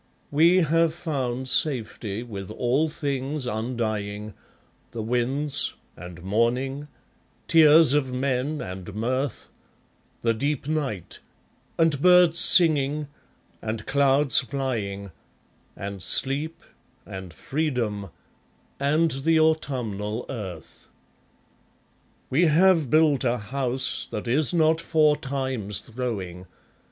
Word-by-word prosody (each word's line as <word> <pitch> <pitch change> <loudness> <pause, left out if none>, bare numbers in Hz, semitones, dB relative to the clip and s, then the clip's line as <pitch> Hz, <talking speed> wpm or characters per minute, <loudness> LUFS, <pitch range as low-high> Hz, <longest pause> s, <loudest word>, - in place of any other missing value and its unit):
We 170 +5 +4
have 165 0 +2
found 130 -7 -3
safety 120 -5 0
with 100 -5 -8
all 125 +8 0
things 140 -2 -3
undying, 110 -3 -3 0.6
The 115 -2 -4
winds, 125 +5 0 0.2
and 90 -1 -11
morning, 125 +8 -1 0.6
tears 155 -2 +7
of 140 -3 0
men 130 +3 -2
and 95 +2 -8
mirth, 130 +4 -3 0.7
The 115 -1 +2
deep 140 +4 -2
night, 140 - -3 0.6
and 160 -4 +2
birds 180 -2 +5
singing, 150 -5 +4 0.5
and 110 -1 -5
clouds 140 -1 +3
flying, 110 -7 -4 0.6
And 100 -1 -7
sleep, 140 - -1 0.4
and 95 -2 -8
freedom, 120 - -3 0.7
and 155 +4 +2
the 160 +5 +1
autumnal 125 -9 -1
earth. 95 - -8 1.4
We 165 +6 +3
have 165 -2 +3
built 155 -3 +3
a 125 -1 +1
house 130 +3 -1
that 105 - -6
is 140 +5 +2
not 160 -1 +2
for 155 -3 +3
Time's 130 -8 -1
throwing. 100 -7 -6
130 Hz, 100 wpm, -24 LUFS, 110-150 Hz, 1.4 s, tears